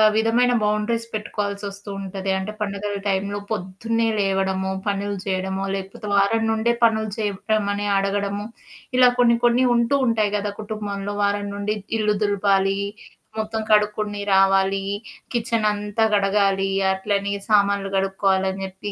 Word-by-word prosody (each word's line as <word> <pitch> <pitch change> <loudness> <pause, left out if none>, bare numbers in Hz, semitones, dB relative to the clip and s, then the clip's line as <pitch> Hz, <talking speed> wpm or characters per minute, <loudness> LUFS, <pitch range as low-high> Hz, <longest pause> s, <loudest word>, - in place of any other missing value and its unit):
విధమైన 230 +3 +3
బౌండరీస్ 210 +2 0
పెట్టుకోవాల్సొస్తూ 205 -1 -4
ఉంటది. 195 0 -5
అంటే 190 +3 -4
పండగల 205 0 -3
టైంలో 200 +1 -1
పొద్దున్నే 220 +4 -1
లేవడమో, 190 -1 0 0.2
పనులు 200 0 -1
జేయడమో, 190 0 -2
లేకపోతే 195 +2 -7
వారం 210 +3 +3
నుండే 220 +2 +1
పనులు 220 -1 +3
చేయడం 210 0 -1
అనేడగడము, 200 0 -1 0.5
ఇలా 250 -1 +7
కొన్ని 235 -1 +5
కొన్ని 245 +2 +4
ఉంటూ 235 +4 +2
ఉంటాయి 215 -3 +1
గదా! 205 0 -2
కుటుంబంలో 205 -1 -4
వారం 205 0 0
నుండి 205 +1 -2 0.2
ఇల్లు 210 -1 +1
దులపాలి, 195 -1 +2 0.6
మొత్తం 220 0 -2
కడుక్కొని 210 -1 +2
రావాలి, 195 0 +3 0.5
కిచెనంతా 215 -2 0
గడగాలి, 195 -1 +2 0.3
అట్లనే 200 +1 -1 0.2
సామాన్లు 200 -1 +3
కడుక్కోవాలని, 190 0 +1
అని 195 0 -6
జెప్పి 190 +2 -7
205 Hz, 120 wpm, -22 LUFS, 195-215 Hz, 0.6 s, ఇలా